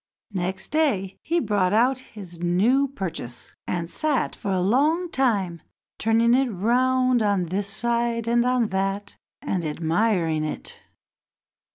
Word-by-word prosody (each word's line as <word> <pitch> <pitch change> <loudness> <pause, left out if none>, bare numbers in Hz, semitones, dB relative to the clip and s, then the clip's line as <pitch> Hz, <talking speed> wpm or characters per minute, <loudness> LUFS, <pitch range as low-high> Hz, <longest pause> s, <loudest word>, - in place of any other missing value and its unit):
Next 185 0 -3
day 235 -12 0
he 340 +1 0
brought 205 - +1
out 250 +4 +3
his 195 -9 -11
new 205 +11 +2
purchase, 175 - -6
and 170 -2 -2
sat 295 - 0
for 205 - -5
a 190 -1 +1
long 300 - +2
time 200 -10 0 0.4
turning 230 +1 +3
it 265 0 +3
round 250 +4 +2
on 200 -4 +1
this 195 +4 -2
side 235 +2 -1
and 235 0 +3
on 250 -3 +1
that, 195 +1 -2 0.3
and 185 -3 -1
admiring 165 +1 0
it. 155 - -6
210 Hz, 135 wpm, -24 LUFS, 185-250 Hz, 0.4 s, out